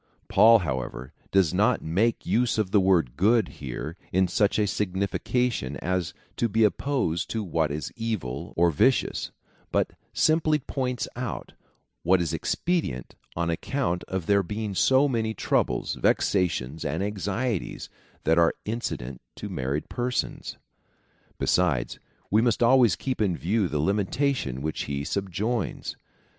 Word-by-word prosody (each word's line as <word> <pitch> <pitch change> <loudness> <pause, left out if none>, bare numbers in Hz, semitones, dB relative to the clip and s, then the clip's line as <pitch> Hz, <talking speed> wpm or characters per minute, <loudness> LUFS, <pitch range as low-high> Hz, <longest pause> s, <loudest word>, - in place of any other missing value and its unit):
^ - - -40
Paul, 115 +1 +7
however, 65 - -4 0.2
does 95 -5 +3
not - - +2
make 105 +9 +1
use 120 0 +1
of 105 -4 0
the 105 - +5
word 85 -10 +2
good 110 - +3
here 70 +6 -5
in 95 0 +3
such 100 +3 +2
a 105 - +3
signification 100 - -1
as 90 -2 -2 0.2
to 120 - +1
be 110 +2 +2
opposed 105 - 0
to 110 -1 -2
what 80 -4 0
is 75 +2 -4
evil 105 - -3
or 85 0 +4
vicious, 130 - +2 0.4
but - - +1 0.2
simply 155 -1 +3
points 130 -3 -3
out 125 -3 -5 0.5
what 90 +2 +4
is 85 -3 -1
expedient 170 - -1 0.2
on 85 0 0
account 90 +1 -1
of 95 -3 -3
there 100 +1 +4
being 105 +2 -4
so 130 +8 +4
many 110 -4 -1
troubles, - - 0
vexations, 80 -6 +1
and 80 +6 -1
anxieties 105 +2 -2 0.4
that 80 +2 +3
are 85 -1 +4
incident 70 - -4
to - - -6
mar 65 +1 -2
ried 75 - -3
persons. 125 0 -3 0.8
Besides, 85 -9 +1 0.3
we 105 +2 +5
must 120 -1 +2
always 120 -5 +5
keep 130 +4 -3
in 95 -5 +1
view 95 - +1
the 75 - -2
limitation 100 - 0
which 80 0 -2
he 70 0 -3
subjoins. 100 +7 -2
95 Hz, 145 wpm, -26 LUFS, 80-115 Hz, 0.8 s, Paul